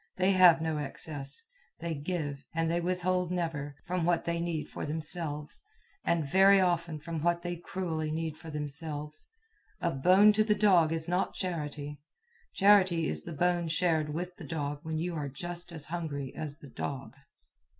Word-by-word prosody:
They 185 +1 +3
have 180 -4 +7
no 160 -2 -1
excess. 145 - -5 0.4
They 170 -1 -2
give, 145 -2 -3
and 165 0 +1
they 170 +1 +1
withhold 180 0 0
never, 160 -5 -2
from 180 -1 -1
what 170 0 +2
they 170 0 -1
need 170 -3 -2
for - - -6
themselves, 150 -1 -4 0.4
and 165 -3 +1
very 195 +5 +6
often 170 -3 +1
from 165 +1 -4
what 170 +1 +1
they 175 0 -2
cruelly 165 -3 -3
need 160 0 -2
for 165 0 -11
themselves. 150 0 -5 0.5
A 170 - 0
bone 185 +9 +6
to 215 +1 +4
the 210 -1 +2
dog 180 -7 +5
is 165 0 -1
not 180 +2 0
charity. 150 -5 -4 0.5
Charity 190 -5 +5
is - - -2
the 170 - -6
bone 175 +2 +1
shared 160 -2 +1
with 180 +3 -4
the - - -9
dog 145 -3 -3
when 160 0 -3
you 175 +2 -2
are 150 -3 -3
just 175 +5 -4
as 160 -3 -2
hungry 145 -6 -3
as 150 -2 -5
the 140 - -13
dog. 135 +1 -5
165 Hz, 170 wpm, -30 LUFS, 150-180 Hz, 0.5 s, have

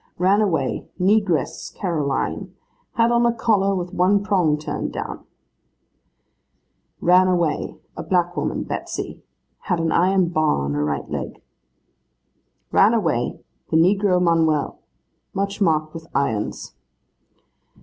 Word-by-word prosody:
'Ran 190 +4 +3
away, 190 -6 -1
Negress 190 -5 +1
Caroline. 155 -8 -2 0.4
Had 230 0 +3
on 240 0 +3
a 235 - +4
collar 205 -4 +1
with 180 -1 -4
one 195 +3 +3
prong 180 -7 +2
turned 150 - -4
down.' - - -6 1.8
'Ran 180 +2 +5
away, 175 -4 0 0.2
a - - -5
black 175 -1 0
woman, 145 - -2
Betsy. - - -5 0.4
Had 175 - 0
an 165 0 0
iron 185 0 +3
bar 155 - +1
on 70 - -2
her 75 0 0
right 75 -1 -2
leg.' - - -6 1.3
'Ran 210 +4 +5
away, 160 - -1 0.3
the 160 - +2
negro 185 +2 +3
Manuel. 165 -4 +1 0.6
Much 200 +1 -2
marked 155 -4 +1
with 160 0 -9
irons. 110 -7 -2
180 Hz, 120 wpm, -22 LUFS, 155-195 Hz, 1.8 s, Ran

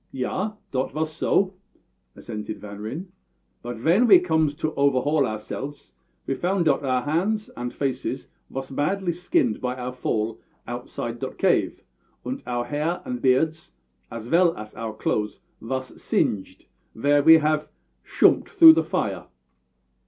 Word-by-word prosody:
"Yah, 190 +11 -2 0.2
dot 130 0 -1
vas 155 +1 -2
so," 190 +4 +1 0.6
assented 105 -1 -6
Van 100 -1 -9
Ryn. 145 - -6 0.5
"But 120 0 -6
vhen 170 - +3
ve 195 -4 +9
comes 160 -4 +1
to 155 +1 -2
overhaul 140 +1 +2
ourselfs 135 +6 -6 0.3
ve - - -1
found 180 +4 0
dot 145 -2 +2
our 130 -2 0
hands 195 - 0
and 120 0 -5
faces 135 -2 -3 0.2
vas 135 0 -6
badly 175 +7 0
skinned 165 -9 0
by 125 0 -2
our 125 0 -5
fall 110 -3 -2 0.3
outside 120 -1 -5
dot - - -5
cave, - - +1 0.4
und - - -4
our 120 -1 -1
hair 150 +7 -2
and 125 -1 -4
beards, 155 - +1 0.4
as 115 -1 -7
vell 170 +4 +3
as 105 0 -9
our 110 -1 -5
clothes, 105 -1 -2 0.2
vas 130 +2 -4
singed 100 -2 -1 0.3
vhere 145 +4 +3
ve 160 - +9
had 155 -1 0 0.4
shoomped - - +3
through 160 -1 +9
the 160 0 +2
fire." 100 - -2
135 Hz, 145 wpm, -24 LUFS, 120-160 Hz, 0.6 s, ve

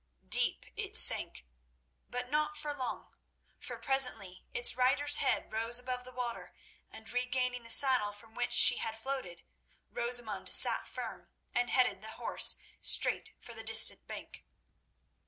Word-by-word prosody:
Deep - - +1
it - - -1
sank, - - +4 0.6
but 250 0 -7
not 300 +2 -4
for 295 -1 -6
long, 260 -3 -9 0.5
for - - -9
presently 250 -9 0
its 475 +1 0
rider's 285 +3 +2
head 265 -5 -3
rose 230 +2 -1
above 250 0 -5
the 255 - -13
water, 245 -2 -9 0.3
and 220 0 -13
regaining 250 0 -4
the 230 - -13
saddle, 255 -4 +5
from 220 +2 -15
which 245 - -5
she 245 - +6
had 220 0 -6
floated, 225 -9 -8 0.5
Rosamund 240 -2 -2
sat - - +3
firm - - -10 0.2
and 245 0 -2
headed 250 -7 -1
the 220 0 -11
horse - - +1 0.2
straight - - 0
for 235 - -12
the 225 - -9
distant 225 0 +6
bank. - - -11
245 Hz, 145 wpm, -29 LUFS, 225-260 Hz, 0.6 s, she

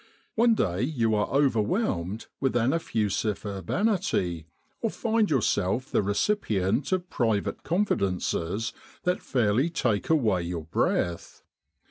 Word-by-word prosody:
One 230 0 +4
day 95 - 0
you 120 -5 +1
are 105 -1 +1
over 135 -5 +3
whelmed 105 - -1
with 135 -3 0
an 120 +3 +2
effusive 110 - -1
urbanity, 100 - -1 0.3
or 225 - +1
find 225 -1 +1
yourself 120 -2 +1
the - - +3
recipient 100 - 0
of 185 -1 -1
private 110 -4 0
confidences 100 - -1 0.3
that 180 0 0
fairly 120 +4 +1
take 115 -10 0
away 115 - +3
your 85 -1 -4
breath. 85 +1 -1
115 Hz, 120 wpm, -27 LUFS, 100-165 Hz, 0.3 s, One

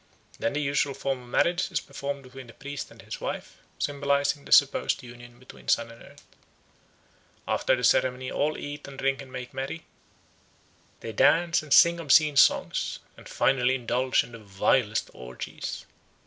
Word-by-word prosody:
Then 115 - -1
the 150 - -1
usual 140 -1 0
form 135 -1 -3
of 120 - -15
marriage 175 +7 +1
is 165 - 0
performed 140 0 -6
between 130 0 -12
the 115 - -13
priest 140 0 -7
and - - -15
his - - -8
wife, - - -5 0.2
symbolising 140 0 0
the - - -12
supposed 140 -2 +4
union 120 0 -13
between 130 +1 -15
Sun 115 0 +1
and 115 - -15
Earth. - - -16 1.2
After - - +2
the - - -5
ceremony 130 0 +2
all 150 +2 0
eat 145 0 -7
and 140 -1 -10
drink 135 0 0
and 135 -2 -12
make 125 -1 -7
merry; 135 +5 -5 1.2
they 115 - -5
dance 165 +9 +3
and 155 -2 -13
sing 170 +3 +6
obscene 150 -1 +4
songs, 135 - +3 0.2
and - - -14
finally 130 -1 +2
indulge 125 +1 +1
in - - -13
the 115 - -10
vilest 105 +2 0
orgies. 65 0 -7
135 Hz, 165 wpm, -27 LUFS, 125-145 Hz, 1.2 s, sing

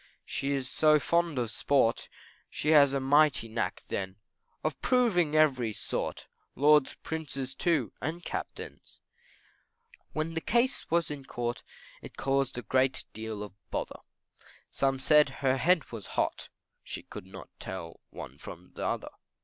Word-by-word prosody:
She 140 +1 -2
is 135 -2 -2
so 155 +3 +4
fond 170 0 +1
of 120 -3 -1
sport, 130 -2 +2 0.4
She 150 - -2
has 145 -3 +7
a 140 - 0
mighty 145 -2 +4
knack 110 0 -2
then, 95 -1 -3 0.5
Of 155 -3 -2
proving 195 -12 +3
every 130 -8 +3
sort, - - -4 0.3
Lords, 150 -1 +5
Prince's 140 -4 -4
too, 150 - +1
and 165 +4 -4
Captains. - - -6 1.1
When 155 +1 -2
the 165 - -1
case 240 +7 +1
was 170 -2 +1
in 145 -2 -5
the 135 - -18
Court, 120 0 -3 0.4
It - - -11
caused 135 -2 0
a 120 - -5 0.5
deal 110 -1 -5
of 105 -3 -9 0.2
bother, - - -4 0.7
Some 135 -1 +1
said 150 +2 +5 0.2
her 130 0 +4
head 165 +4 +2
was 110 -5 -7
hot, - - 0 0.3
She - - -6
could - - -10
not - - -10
tell 85 -3 -7
one - - -9
from - - -10
t'other. - - -3
140 Hz, 145 wpm, -30 LUFS, 120-155 Hz, 1.1 s, has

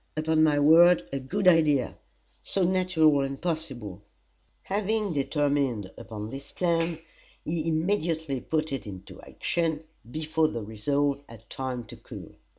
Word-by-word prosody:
Upon 155 0 +2
my 150 -2 +4
word, 165 +4 +6
a 140 - -1
good 185 +9 -1
idea! 155 -7 +4 0.5
So 195 - 0
natural 175 -5 +3
and 135 0 -3
possible!" 140 - -4 0.6
Having 210 0 -1
determined 140 - 0
upon 110 -1 -7
this 140 +1 -8
plan, 170 -2 0 0.5
he 160 0 -2
immediately 160 -4 0
put 155 -2 -1
it 135 - -4
into 95 -2 -10
action 165 -2 -2 0.3
before 155 +2 0
the 115 -6 -4
resolve 140 +7 -1
had 115 -1 -14
time 130 -2 -4
to 115 - -12
cool. - - -11
155 Hz, 135 wpm, -27 LUFS, 135-165 Hz, 0.6 s, word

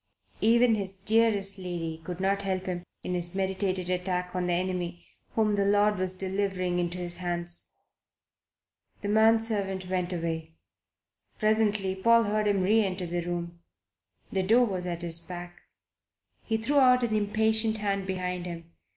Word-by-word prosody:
Even 235 +1 +5
his 195 -3 0
dearest 200 -1 +2
lady 165 -3 -4
could 175 +1 -6
not 195 +1 +1
help 190 -2 -2
him 180 -1 -3 0.2
in 180 - -3
his 175 0 -2
meditated 190 -1 -1
attack 180 0 -1
on 180 -1 -1
the 175 - +1
enemy 175 -1 -2 0.3
whom 215 -2 +2
the 200 -1 +2
Lord 205 0 +3
was 185 0 0
delivering 190 -2 -1
into 175 0 -2
his 175 -1 -2
hands. 175 -1 -3 1.4
The 205 - -2
man 220 +2 +5
servant 195 -4 -2
went 180 -1 -1
away. 165 -2 -3 0.8
Presently 215 -3 +2
Paul 230 +5 +4
heard 210 0 0
him 200 -2 +2
reenter 195 -2 +2
the 175 0 -2
room; 170 0 -4 0.7
the 190 - +1
door 230 +6 +4
was 185 -4 -3
at 170 -1 -3
his 170 -1 -2
back. 175 0 -9 0.8
He 225 - -1
threw 280 +6 +2
out 250 -1 +5
an 220 -2 +1
impatient 220 +1 +1
hand 200 -2 -1
behind 180 -1 -3
him. 170 -1 -8
190 Hz, 155 wpm, -28 LUFS, 175-210 Hz, 1.4 s, Even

